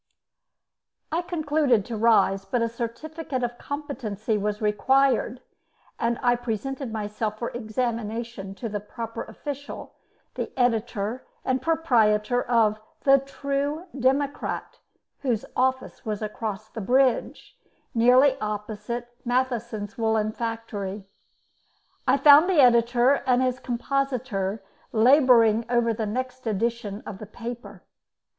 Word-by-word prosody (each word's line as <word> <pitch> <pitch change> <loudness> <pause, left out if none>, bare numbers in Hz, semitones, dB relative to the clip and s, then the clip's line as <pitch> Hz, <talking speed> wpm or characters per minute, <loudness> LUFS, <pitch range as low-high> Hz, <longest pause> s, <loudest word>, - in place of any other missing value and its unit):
I 330 +3 +1
concluded 300 - +1
to 235 - -5
rise, 215 -3 +3
but 230 +5 0
a 230 - 0
certificate 255 +4 -4
of 240 0 -3
competency 245 -8 -3
was 210 0 -1
required, 255 +3 +2 0.6
and 235 0 0
I 245 0 +4
presented 245 +2 -4
myself 215 0 -3
for 235 - -4
examination 230 -3 -3
to 230 - -5
the 205 -1 -3
proper 230 +2 -6
official, 285 +5 -7 0.4
the - - -4
editor 230 -1 0 0.2
and 260 -1 +1
proprietor 245 -7 +2
of 220 -4 +2 0.2
'The 275 0 +6
True 280 +4 -2
Democrat' 275 +2 -1 0.4
whose 240 -6 -1
office 260 0 0
was 215 -1 -3
across 215 0 -4
the 220 - -7
bridge, 255 +4 +1 0.4
nearly 255 +4 +5
opposite 210 +3 -4
Matheson's 235 -3 -2
woollen 220 -1 +1
factory. 215 -4 -4 1.0
I 260 +2 +5
found 290 +5 +7
the 360 -5 +3
editor 245 +1 +5
and 250 0 +4
his 255 0 0
compositor 240 -6 -2 0.3
labouring 235 -2 +5
over 240 -1 +2
the 220 0 -3
next 255 +2 -4
edition 220 -1 -2
of 195 - -7
the 215 - -8
paper. 220 -3 -8
235 Hz, 115 wpm, -25 LUFS, 215-260 Hz, 1.0 s, found